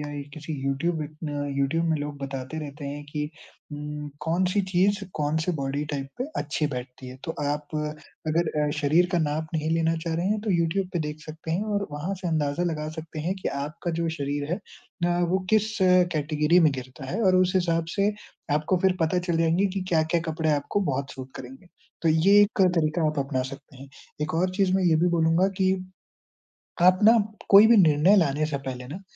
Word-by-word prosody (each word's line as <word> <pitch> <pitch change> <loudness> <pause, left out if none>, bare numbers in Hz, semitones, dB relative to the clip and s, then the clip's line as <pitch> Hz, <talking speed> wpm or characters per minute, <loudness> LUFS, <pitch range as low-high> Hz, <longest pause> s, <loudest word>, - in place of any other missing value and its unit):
या 150 0 -5 0.2
किसी 155 0 -7
यूट्यूब 160 +5 0
अ, 150 - -4 0.5
यूट्यूब 140 +5 +1
में 160 -1 +1
लोग 145 -1 -5
बताते 135 +2 -5
रहते 145 -1 -7
हैं 145 +1 -5
कि 150 0 -3 0.4
उम, 150 0 -6
कौन 170 +4 0
सी 205 - +2
चीज़ 195 +3 +3 0.2
कौन 150 +1 0
से 180 - 0
बॉडी 140 +2 -2
टाइप 135 -2 -4
पे 255 - -1 0.2
अच्छी 150 +1 -1
बैठती 125 -1 -7
है। 130 - -9
तो 160 - -3
आप 145 +1 -2
अगर 155 +2 -3 0.2
अ, 145 - 0
शरीर 160 +5 +4
का 175 - +3
नाप 155 0 -1
नहीं 155 0 -1
लेना 165 0 +2
चाह 165 -1 -1
रहे 170 +3 -1
हैं 210 +1 0
तो 215 0 -2
यूट्यूब 175 +2 +1
पे 175 - 0
देख 150 +1 -7
सकते 160 +1 -8
हैं 175 +6 0
और 200 0 -1
वहाँ 155 +7 -3
से 180 - -1
अंदाज़ा 155 +1 0
लगा 150 0 -4
सकते 155 -1 -6
हैं 180 +5 -1
कि - - 0 0.2
आपका 155 +4 -5
जो 165 - 0
शरीर 145 +1 -2
है - - +1 0.5
अ, 175 0 +1
वो 185 +2 +2
किस 215 +1 +2 0.4
कैटेगरी 150 +3 +2
में 155 -2 +5
गिरता 130 0 -8
है 205 +6 -2
और 185 -2 +4
उस 185 0 +3
हिसाब 165 -2 +1
से 200 +1 +2 0.4
आपको 155 +5 +1
फिर 190 -1 +3
पता 165 +2 +2
चल 170 - +2
जाएँगे 165 +4 +3
कि - - 0
क्या-क्या 165 0 +2
कपड़े 160 0 0
आपको 145 +7 -1
बहुत 135 +1 -3
सूट 130 0 -9
करेंगे, 130 +7 -10 0.4
तो 165 - +2
ये 185 +6 +5
एक 205 0 +2 0.2
तरीक़ा 155 +1 +1
आप 155 -1 -1
अपना 135 -1 -1
सकते 135 -1 -12
हैं। 135 +2 -11 0.3
एक 155 - -3
और 180 +3 +1
चीज़ 195 -2 +2
मैं 190 - +1
ये 165 -2 +4
भी 175 - +3
बोलूँगा 170 +2 +3
कि 190 0 +3 1.1
आप 185 +1 +6
ना 225 +2 +7 0.3
कोई 200 +2 +9
भी 235 - +7
निर्णय 170 +1 +5
लाने 155 -4 +2
से 140 -3 -3
पहले 125 -2 -6
ना, 175 +8 -7
160 Hz, 210 wpm, -26 LUFS, 145-180 Hz, 1.1 s, कोई